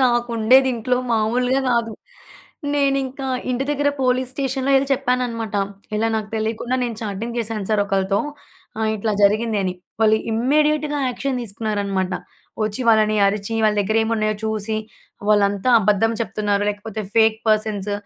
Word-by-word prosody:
నాకు 240 -1 +2
ఉండేది 260 +4 +5
ఇంట్లో 250 +2 0 0.2
మామూలుగా 245 +4 +1
కాదు. 230 -2 +1 0.8
నేనింకా 275 -1 0 0.2
ఇంటి 255 +2 -1
దగ్గర 290 0 +1
పోలీస్ 255 0 +1
స్టేషన్‍లో 270 0 -1
ఎళ్ళి 270 +1 +2
చెప్పాననమాట, 245 -5 -1 0.4
ఇలా 225 +1 +1
నాకు 215 -1 -3
తెలియకుండా 225 +3 -1
నేను 230 -3 -4
చాటింగ్ 220 +3 -4
చేశాను 215 -3 -4
సార్ 210 - +3
ఒకళ్ళతో 195 0 +1 0.6
ఆహ్, 220 0 +1
ఇట్లా 215 +1 -1
జరిగింది 215 +1 +3
అని. 185 -1 -2 0.3
వాళ్ళు 220 0 +5 0.2
ఇమ్మీడియేట్‌గా 295 +5 +1
యాక్షన్ 260 +1 -2
తీసుకున్నారనమాట. 200 -3 -2 0.5
వచ్చి 215 +4 -3
వాళ్ళని 215 -1 +4
అరిచి, 200 +2 -1
వాళ్ళ 215 -1 +3
దగ్గర 215 +3 0
ఏమున్నాయో 215 -1 0
చూసి 220 0 -2 0.5
వాళ్ళంతా 205 +2 +2
అబద్ధం 210 +3 +2
చెప్తున్నారో, 205 0 -1
లేకపోతే 210 +1 -6
ఫేక్ 220 -1 +4
పర్సన్స్ 210 -2 0
220 Hz, 135 wpm, -21 LUFS, 210-250 Hz, 0.8 s, ఉండేది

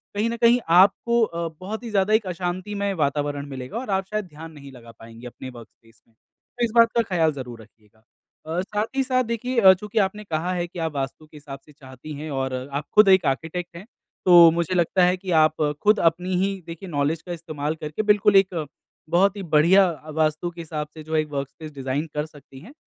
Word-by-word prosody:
कहीं 215 +3 0
न 235 - -3
कहीं 235 +1 +4
आपको 200 +7 +4
अ, 170 -5 -2
बहुत 210 +5 -6
ही 235 - -6
ज्यादा 200 +1 +1
एक 220 -1 +3
अशांतिमय 185 +3 -3
वातावरण 145 -3 -1
मिलेगा 130 - -7
और 255 - -8
आप 195 -1 0
शायद 215 -1 -2
ध्यान 160 -1 -11
नहीं 140 -3 -13
लगा 120 -3 -14
पाएँगे 115 +2 -11
अपने 130 +2 -9
वर्कस्पेस 115 -1 -16
में। 115 - -33 0.4
तो 245 - -1
इस 230 - -5
बात 230 -1 +6
का 235 - +4
ख्याल 160 -2 +3
ज़रूर 125 -4 -8
रखिएगा। 110 0 -23 0.4
अ, 165 +3 -2
साथ 205 +2 -2
ही 270 - +2
साथ 255 -1 +1
देखिए 235 +2 -2
अ, 190 -1 +9
चूँकि 210 +3 -3
आपने 205 +2 -1
कहा 170 -1 -2
है 175 -1 -2
कि 175 0 -10
आप 160 -1 -2
वास्तु 135 +3 -4
के 150 - -15
हिसाब 140 -2 -10
से 150 - -18
चाहती 135 +1 -11
हैं 150 +2 -7
और 135 -1 -2 0.2
आप 145 +2 -3
खुद 210 -1 +7
एक 190 -1 +5
आर्किटेक्ट 165 +6 -3
हैं। 180 - -11 0.4
तो 175 -2 +8
मुझे 170 +2 -1
लगता 180 +1 +2
है 180 +1 +3
कि 185 0 -6
आप 155 0 -1 0.3
खुद 210 +1 +4
अपनी 175 +3 +1
ही 195 -1 -2
देखिए 170 +3 -8
नॉलेज 150 +1 -1
का 180 - -9
इस्तेमाल 155 -2 -4
करके 155 +4 -4
बिल्कुल 210 -1 +3
एक 185 -5 +3 0.4
बहुत 190 +4 +3
ही - - -5
बढ़िया 175 +4 +4 0.3
वास्तु 155 +2 0
के 170 0 -9
हिसाब 150 -2 -5
से 155 - -10
जो 160 +1 -4
एक 155 -1 +1
वर्कस्पेस 145 +2 -6
डिजाइन 135 +2 -3
कर 150 0 -2
सकती 145 -3 -15
हैं। 215 - -14
170 Hz, 220 wpm, -23 LUFS, 145-195 Hz, 0.4 s, अ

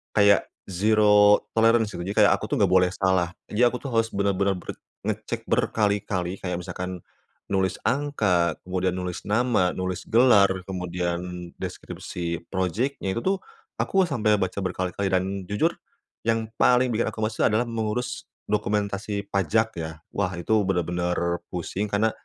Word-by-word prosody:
kayak 100 -2 +5 0.2
zero 105 +1 +5 0.2
tolerance 115 -1 +4
gitu 85 - -5
jadi 100 - -3
kayak 100 - +6
aku - - -6
tuh - - -1
enggak 95 -3 +3
boleh 90 -1 +5
salah, 95 -2 +2 0.2
jadi 120 +4 +4
aku 120 - -1
tuh 140 - -4
harus 115 -1 +2
bener-bener 100 0 +1
ber 90 - -11 0.3
ngecek - - -3
berkali-kali 100 -3 0
kayak 90 -1 -3
misalkan, 90 0 -6 0.5
nulis 95 -1 +1
angka, 105 -12 +1
kemudian 90 0 -1
nulis 90 -1 -4
nama, 110 -4 +2
nulis 95 -1 -3
gelar, 110 -5 +5 0.2
kemudian 90 -1 -4
deskripsi 85 -1 -5
projectnya, 95 +4 -1
itu - - 0
tuh, 195 +1 +1 0.4
aku 195 0 +2
sampai 110 -8 +2
baca 95 0 -2
berkali-kali 95 +1 -2
dan 95 0 +2 0.3
jujur, 105 0 +2 0.6
yang 115 -1 0
paling 125 0 +4
bikin 115 +1 0
aku 110 0 -4
males 110 0 -2
itu - - +5
adalah 110 +3 +2
mengurus 120 +2 -3 0.2
dokumentasi 105 0 -1
pajak 100 +4 +2
ya, 80 -1 -4 0.2
wah 100 - 0
itu 85 +5 -5 0.2
bener-bener 90 -1 0
pusing 90 +4 -3
karena, 105 +2 +1
100 Hz, 150 wpm, -25 LUFS, 90-110 Hz, 0.6 s, kayak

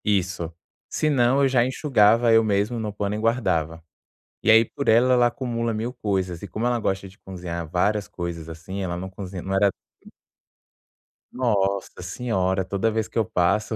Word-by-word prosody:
Isso. 95 -5 0 0.4
Se 155 - 0
não 135 0 +3
eu - - +5
já 130 -2 +3
enxugava, 120 -3 +3
eu 115 0 +6
mesmo 105 +3 0
no 110 -2 -3
pano 105 0 -2
e - - -3
guardava. 85 -9 0 0.6
E - - 0
aí 110 +1 +8
por 140 +4 -6
ela, 120 +3 +5
ela 120 -1 +5
acumula 115 -2 -2
mil 115 +3 -3
coisas. 95 -7 -2
E 100 - -6
como 110 +6 -3
ela 120 -1 +1
gosta 95 -2 -2
de 95 +1 -17
cozinhar 85 -3 -6
várias 105 +4 0
coisas, 85 -5 -6
assim, 85 +4 -7
ela 85 -2 -3
não 95 +2 -5
cozinha 95 -1 -7
não 95 - -4
era 100 +1 +4 0.3
p - - -16 1.2
Nossa 100 -7 -1
Senhora. 95 -2 -1
Toda 100 +4 0
vez 110 0 -1
que - - -8
eu 115 - +4
passo, 100 +4 0
105 Hz, 185 wpm, -24 LUFS, 95-115 Hz, 1.2 s, aí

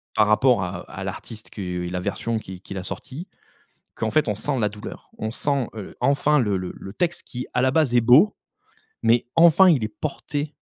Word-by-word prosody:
Par 105 - +4
rapport 105 -1 +4
à 90 - -4
-à - - -7
l'artiste 110 -1 -8
qui 90 -3 -4
la 90 0 -3
version 110 +4 -2
qui 95 -3 -10
qu'il 95 - -8
a 95 - -4
sorti. 140 - -6 0.7
Qu'en 110 -1 -2
fait, 155 - +2
on 105 - +1
sent 135 +6 -2
la 105 -3 +2
douleur, 105 0 -10
on 110 - -3
sent, 140 +1 -1
heu, 105 -3 -8
enfin 140 +3 +3
le 105 -5 +1
le 90 -1 -4
le 95 - -9
texte, 175 - -1
qui 125 0 -6
à 125 - +2
la 130 - +3
base 140 -3 +2
est 120 - +6
beau, 130 - +5 0.7
mais 115 +1 +3
enfin, 170 +3 +7
il 145 -8 +3
est - - -2
porté 145 +2 -4
120 Hz, 210 wpm, -23 LUFS, 105-145 Hz, 0.7 s, enfin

